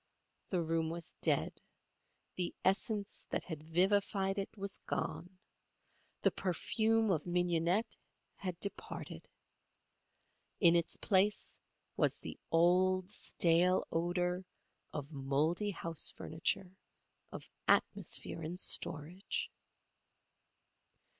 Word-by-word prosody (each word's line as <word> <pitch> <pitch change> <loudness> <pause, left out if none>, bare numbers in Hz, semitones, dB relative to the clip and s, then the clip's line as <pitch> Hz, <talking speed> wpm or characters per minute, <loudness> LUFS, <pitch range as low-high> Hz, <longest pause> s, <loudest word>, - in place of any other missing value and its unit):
The 180 -3 +1
room 165 0 0
was 170 0 -6
dead. - - +1 0.7
The 180 -1 -2
essence 205 +1 0
that - - -1
had 160 -4 -6
vivified 195 +4 +2
it 195 - -3
was 200 0 -2
gone. 180 +1 -4 0.9
The - - +5
perfume 220 +4 +1
of 160 -2 0
mignonette 175 +3 +1 0.4
had 180 -3 -5
departed. 200 - -4 1.3
In 170 -4 +7
its 170 -1 +1
place 205 0 +1 0.4
was - - +2
the - - -8
old, 185 +3 +4
stale 175 +1 +3
odour 180 +2 0 0.5
of 145 0 -5
mouldy 150 +8 0
house 165 -4 -2
furniture, 165 +3 -2 0.6
of - - -8 0.2
atmosphere - - +1
in 165 +3 -4
storage. 175 +1 0
180 Hz, 95 wpm, -35 LUFS, 165-195 Hz, 1.3 s, In